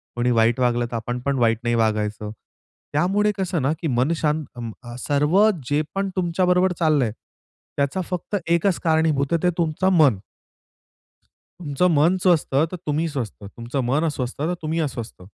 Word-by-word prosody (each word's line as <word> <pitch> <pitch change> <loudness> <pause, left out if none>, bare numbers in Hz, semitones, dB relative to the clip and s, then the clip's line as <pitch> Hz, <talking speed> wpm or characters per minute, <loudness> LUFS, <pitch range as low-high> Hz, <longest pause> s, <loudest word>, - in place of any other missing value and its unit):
कोणी 120 +1 +1
वाईट 115 +1 +3
वागलं 120 -1 +1
तर - - -4
आपण 120 +2 -3
पण 140 -1 0
वाईट 115 -2 +2
नाही 120 0 +1
वागायचं. 105 -1 -1 0.6
त्यामुळे 195 +7 +2
कसं 185 -4 -1
ना 135 +3 +1
की 165 - -1
मन 130 +2 +1
शांत 155 0 0 0.6
सर्व 150 +7 +2 0.3
जे 145 +1 +2
पण 195 0 -1
तुमच्याबरोबर 180 +1 +2
चाललंय, 150 -8 +2 0.7
त्याचा 140 +6 0
फक्त 180 +3 -3
एकच 170 +2 +2
कारणीभूत 160 -3 +1
आहे 165 - +1
ते 180 - +4
तुमचं 170 +2 +1
मन. 140 - +5 1.4
तुमचं 155 +1 0
मन 160 +6 +4
स्वस्थ 175 -4 +3 0.2
तर - - -4
तुम्ही 155 +2 0
स्वस्थ. 130 -8 -4
तुमचं 120 +6 -5
मन 140 +6 +1
अस्वस्थ 130 -5 -3
तर 165 +4 0
तुम्ही 160 +1 -2
अस्वस्थ. 120 -7 -8
150 Hz, 155 wpm, -22 LUFS, 120-170 Hz, 1.4 s, मन